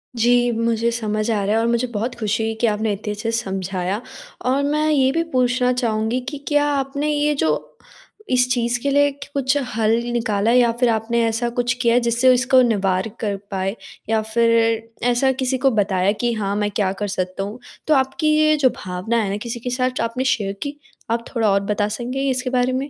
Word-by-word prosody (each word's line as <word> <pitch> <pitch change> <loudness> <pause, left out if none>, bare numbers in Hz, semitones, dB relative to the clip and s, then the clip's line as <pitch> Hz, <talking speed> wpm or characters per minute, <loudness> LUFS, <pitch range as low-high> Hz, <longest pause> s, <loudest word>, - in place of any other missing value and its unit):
जी, 240 +1 +3
मुझे 230 0 0
समझ 215 -1 -2
आ 205 -2 0
रहा 210 +2 +1
है - - +3
और 230 - +1
मुझे 235 +1 +1
बहुत 230 +5 -2
खुशी 220 -1 -1
हुई 225 0 -1
कि 235 - +4
आपने 215 0 0
इतने 210 +1 -5
अच्छे 225 +2 -3
से 230 - 0
समझाया। 190 +1 -3 0.4
और 265 +2 +2
मैं 300 +2 +1
ये 270 -3 +3
भी 330 +3 0
पूछना 250 0 +2
चाहूँगी 230 0 0
कि 290 - -6
क्या 290 -1 +3
आपने 280 +2 -2
ये 295 0 +1
जो 160 - +1 0.8
इस 250 0 +3
चीज़ 240 0 0
के 280 - 0
लिए 285 0 +4 0.2
कुछ 275 0 +1 0.2
हल 225 0 +2 0.2
निकाला, 220 -1 +1
या 240 -1 +4
फ़िर 245 -2 +3
आपने 230 +1 0
ऐसा 235 +2 -1
कुछ 245 0 0
किया 235 -1 +3
है 245 - +5
जिससे 240 +2 +4
इसको 255 +1 +4
निवार 195 -3 +1
कर 205 -3 -1 0.2
पाए, 195 +2 -2 0.3
या 220 -1 +2
फ़िर 230 0 +1 0.2
ऐसा 265 +2 +2
किसी 260 0 +1
को 265 +1 +2
बताया 200 -2 +1
कि 240 0 +1
हाँ, 200 -2 -2
मैं 205 0 -1
क्या 195 -2 0
कर 205 - 0
सकता 185 0 -3
हूँ? 210 +5 -7 0.3
तो 310 - +4
आपकी 270 +3 +1
ये 310 0 +4
जो 265 -3 +4
भावना 185 +5 -2
है 195 - -2
ना, 200 - -2
किसी 235 +2 -5
के 250 - -4
साथ 255 +1 0
जो - - 0
आपने 230 +3 -2
शेयर 205 -6 0
की, 290 +1 -6 0.3
आप 230 0 -1
थोड़ा 225 -3 +2
और 200 - +3
बता 205 0 0
सकेंगे 255 +5 -2
इसके 255 0 -1
बारे 250 0 +1
में? 270 +3 -2
235 Hz, 215 wpm, -21 LUFS, 215-255 Hz, 0.8 s, है